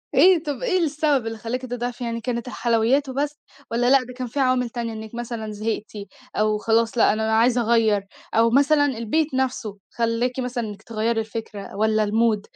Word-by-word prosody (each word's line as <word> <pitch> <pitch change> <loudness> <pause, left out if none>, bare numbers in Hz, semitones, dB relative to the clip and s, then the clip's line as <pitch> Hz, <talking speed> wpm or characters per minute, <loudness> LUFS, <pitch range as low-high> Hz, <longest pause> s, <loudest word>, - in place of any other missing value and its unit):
إيه، 360 -3 +6
طَب 290 - -4
إيه 380 -7 +2
السبب 295 -6 +1
اللي 225 0 -4
خلّاكِ 235 +3 -4
تضعفي؟ 245 0 -4
يعني 230 0 -3
كانت 235 0 -3
الحلويّات 245 +4 +1
وبس 290 +3 -2 0.3
والّا 240 +1 +2
لأ؟ 270 -1 +5
ده 250 - -10
كان 250 0 -5
في 260 +5 -4
عوامل 255 -2 +2
تانية 230 -1 -4
إنِك 220 +1 -8
مثلًا 235 -2 -5
زهِقتِ 215 0 -3 0.4
أو 215 0 +2
خلاص، 225 +2 +1
لأ 220 - +5
أنا 220 +1 -1
عايزة 240 +1 +3
أغيّر، 220 -3 +2 0.3
أو 230 +1 +4
مثلًا 290 +3 +4
البيت 270 +4 -1
نَفْسه 255 -5 -2
خلّاكِ 235 +2 -1
مثلًا 250 -1 -2
إنِك 205 -1 -9
تغيّري 225 0 -1
الفكرة 220 -3 -6
والّا 215 +1 +2
الmood؟ 220 0 +2
235 Hz, 180 wpm, -23 LUFS, 220-255 Hz, 0.4 s, إيه